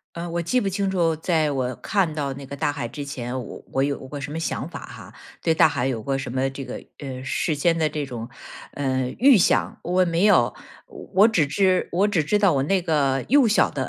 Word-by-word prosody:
呃， 170 +1 -5
我 170 0 -2
记 250 +10 +1
不 200 - -1
清 195 0 -1
楚， 170 -4 +1
在 160 -1 +1
我 130 -2 -2
看 190 -6 0
到 140 -3 -2
那 140 - -9
个 140 - -8
大 150 +1 0
海 135 -4 -4
之 145 +5 -7
前， 130 -2 -5
我 - - -10
我 135 - +1
有 140 0 0
过 145 +1 -6
什 135 - -6
么 155 - -4
想 165 - -3
法 - - -8
哈， - - -11 0.3
对 165 - +1
大 - - +6
海 130 -5 -1
有 120 -5 -2
过 135 +2 -1
什 135 -2 -5
么 130 +2 0
这 135 0 -7
个， 125 - -7
呃， 130 -2 -7
事 160 - -1
先 165 +3 +1
的 155 - +2
这 150 -1 -3
种， 120 -3 -7 0.5
呃， 130 -2 -1
预 265 -2 +6
想， 175 - +2
我 180 +1 +2
没 170 +3 +2
有。 175 - +4 0.6
我 200 +3 +7
只 180 -10 +2
知 185 +4 +1
我 190 +4 +3
只 185 -6 +1
知 205 +8 +1
道 200 -4 +4
我 135 -1 +1
那 190 +5 +1
个 140 -6 +1
幼 275 -3 +5
小 215 - +3
的 - - -3
150 Hz, 255 characters per minute, -23 LUFS, 135-180 Hz, 0.6 s, 我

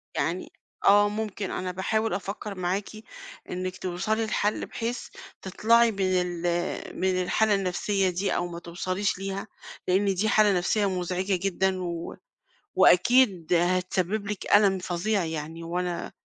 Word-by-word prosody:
يعني 175 +3 -2 0.3
آه، 205 +1 +6
ممكن 210 -2 -4
أنا 185 0 -3
باحاول 220 +4 -1
أفكر 200 +1 -5
معاكِ، 185 +2 -2 0.6
إنك 185 0 -4
توصلي 215 +5 -1
لحل 210 -1 0
بحيث 235 +1 -4 0.3
تطلعي 230 +5 +3
من 200 - -9 0.2
ال 175 -1 -4 0.5
من 185 -1 +1
الحالة 210 +3 +2
النفسية 195 0 0
دي 185 +3 -1
أو 175 - -1
ما 170 0 -7
توصليش 185 +3 -2
ليها، 195 +2 -4 0.4
لأن 195 +2 +2
دي 215 +4 +1
حالة 210 -3 +4
نفسية 200 +4 +1
مزعجة 185 +1 -1
جدًا، 190 0 0
و 170 -1 -5 0.6
وأكيد 190 -4 +4
هتسبب 185 +3 0
لِك 205 -2 -4
ألم 200 -2 +4
فظيع 185 +2 -1
يعني 160 +1 -5
وأنا 175 +1 -3
190 Hz, 135 wpm, -26 LUFS, 180-205 Hz, 0.6 s, آه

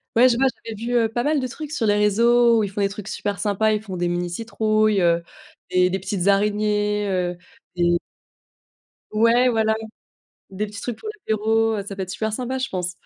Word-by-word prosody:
Ouais, 240 +3 +7
je 240 -2 +2
vois, 270 +2 +3 0.2
j'avais 225 - -5
vu, 235 +3 -4
heu, 230 -2 +3
pas 240 +2 -2
mal 300 +1 +1
de 260 - -2
trucs 300 +4 -8
sur 280 -7 -1
les 205 - +4
réseaux 230 +3 +4
où - - +2
ils 205 - -2
font 205 +1 -4
des 200 - +2
trucs 205 0 -8
super 205 -2 -3
sympas, 210 +1 +1
ils 210 - -1
font 200 -4 -7
des 175 0 -1
mini 175 0 -1
citrouilles, 215 +1 +1
heu, 170 -1 +2 0.5
des 180 0 +3
des 190 - -1
petites 190 -1 -2
araignées, 210 +1 +1
heu, 180 -2 -1 0.4
des 175 0 +2 1.1
ouais, 230 +3 +4
voilà. 220 -2 +2 0.8
Des 200 +2 -3
petits 205 -1 -9
trucs 240 -3 -5
pour 435 - -8
l'apéro, 225 - 0
heu, 200 - -3
ça 200 - -6
peut 195 - -3
être 185 - -6
super 220 +3 -2
sympa, 255 +3 -3
je 260 0 -2
pense. 180 -1 -3
210 Hz, 215 wpm, -22 LUFS, 195-230 Hz, 1.1 s, Ouais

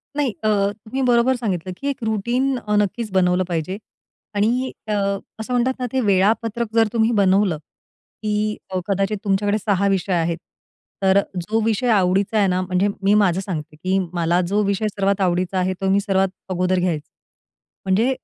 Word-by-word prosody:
नाही 285 -5 +1
अ, - - +2 0.2
तुम्ही 225 +5 -6
बरोबर 250 +1 +3
सांगितलं 185 -7 -3
की 280 - -5
1 270 -3 -4
रूटीन 240 +5 0 0.3
नक्कीच 210 +2 -1
बनवलं 185 -1 +2
पाहिजे 175 +2 -2 0.6
आणि 240 +5 +1 0.2
अ, 210 - -1 0.5
असं 235 +3 -4
म्हणतात 250 +2 +2
ना, 250 - -1
ते 265 - +2
वेळापत्रक 215 +3 +1
जर 225 -1 +5
तुम्ही 225 0 +2
बनवलं 190 -3 +3
की 210 +7 -5
अ, 185 -1 -1
कदाचित 195 +1 0
तुमच्याकडे 205 +1 +1
6 200 -2 +1
विषय 190 -1 0
आहेत 170 -1 0 0.7
तर 190 +1 +5 0.2
जो 210 +6 -1
विषय 225 +3 0
आवडीचा 195 +1 +2
आहे 200 - +4
ना, 185 0 +1
म्हणजे 185 +2 +1 0.2
मी 200 +1 +4
माझं 195 -4 +3
सांगते 155 -6 -5
की 185 +5 -1 0.2
मला 170 0 +1
जो 205 +3 +1
विषय 200 +2 0
सर्वात 200 -1 0
आवडीचा 180 +1 0
आहे 185 +1 0
तो 195 - +1
मी 200 - +4
सर्वात 195 -1 +1 0.2
अगोदर 185 0 +1
घ्यायचे. 165 -5 -2 0.8
म्हणजे 210 +7 +2
200 Hz, 170 wpm, -21 LUFS, 185-220 Hz, 0.8 s, जर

